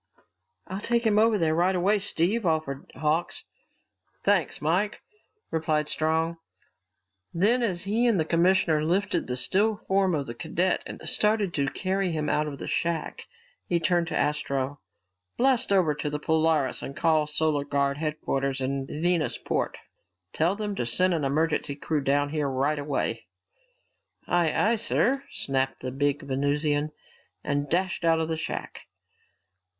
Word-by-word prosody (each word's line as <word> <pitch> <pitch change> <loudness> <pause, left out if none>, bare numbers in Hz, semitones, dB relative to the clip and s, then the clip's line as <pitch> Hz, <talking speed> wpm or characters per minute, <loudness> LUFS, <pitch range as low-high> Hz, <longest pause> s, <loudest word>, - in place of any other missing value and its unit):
"I'll 190 +1 -5
take 235 +1 +1
him 210 -1 +4
over 220 0 +4
there 160 -4 +1
right 180 +3 +2
away, 200 +4 +2
Steve," 200 +3 0
offered 155 -5 -2
Hawks. 155 +5 -1 0.8
"Thanks, - - +1
Mike," 180 +8 0 0.5
replied 155 -2 0
Strong. 160 +1 0 1.0
Then 220 +9 +3
as 185 -7 -1
he 220 +5 +1
and 220 -6 +3
the 160 - +1
commissioner 170 -2 +3
lifted 185 +6 0
the 125 - -2
still 200 - +2
form 190 -3 +1
of 140 -2 -2
the 120 - -6
cadet 170 +8 0
and - - -8
started 210 -4 +1
to 140 -2 0
carry 190 +4 -1
him 155 -2 -2
out 150 0 +1
of 140 -2 -6
the - - -7
shack, 170 -2 -2 0.4
he 175 - +1
turned 170 0 +1
to - - -2
Astro. 140 -1 -1 0.6
"Blast 255 -3 +2
over 180 -6 +4
to 150 +1 -3
the 150 - -2
Polaris 160 -3 +1
and 140 +2 -7
call 155 -2 +2
Solar 150 -1 +1
Guard 140 -1 0
headquarters 140 -3 -2
in 135 +1 -2
Venusport. 165 +1 -1 0.6
Tell 170 +5 +2
them 210 -1 -3
to - - -1
send 180 +10 +2
an 160 -3 -1
emergency 150 +1 0
crew 150 +1 -2
down 145 +1 +1
here 150 -2 -1
right 140 +3 0
away." 135 -6 -2 1.0
"Aye, 175 -2 +2
aye, 230 +2 +2
sir," 265 +4 +1
snapped 135 -1 -1
the 130 - -4
big 145 +2 0
Venusian 145 +2 0 0.5
and 145 0 -1
dashed 180 +2 0
out 165 -1 +3
of 160 0 -1
the 160 - -1
shack. 160 - -6
160 Hz, 155 wpm, -26 LUFS, 145-185 Hz, 1.0 s, him